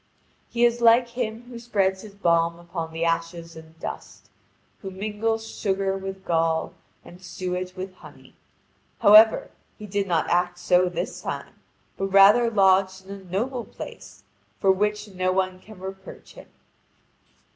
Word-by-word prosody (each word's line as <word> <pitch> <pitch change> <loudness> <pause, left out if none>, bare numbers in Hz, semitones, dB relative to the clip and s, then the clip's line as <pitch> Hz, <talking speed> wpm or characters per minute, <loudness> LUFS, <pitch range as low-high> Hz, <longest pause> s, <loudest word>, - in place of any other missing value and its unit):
He 240 0 +2
is 240 0 +1
like 235 +1 +5
him 235 -1 -4
who 240 -1 -10
spreads 195 -5 0
his 205 -2 -12
balm 170 -3 +1
upon 170 -1 -6
the 165 +1 -2
ashes 165 0 -2
and 160 0 -14
dust, - - -8 0.5
who 195 - -6
mingles 215 +3 -2
sugar 195 -2 -1
with 195 0 -7
gall, 165 -1 0 0.3
and 175 +1 -14
suet 180 0 -5
with 185 0 -6
honey. - - -16 0.7
However, 215 +2 +7 0.3
he 210 - -9
did 200 0 -2
not 170 -3 +1
act 175 0 +1
so 180 +1 +3
this 175 +1 -5
time, - - -6 0.4
but 195 - -1
rather 200 +5 +6
lodged 190 -2 +2
in 195 - -11
a 200 -1 -10
noble 235 +8 -2
place, - - -11 0.4
for 195 - +4
which 210 +2 -1
no 185 -1 -1
one 185 0 -1
can 215 +2 -14
reproach 190 +1 -10
him. - - -13
190 Hz, 150 wpm, -24 LUFS, 180-210 Hz, 0.7 s, However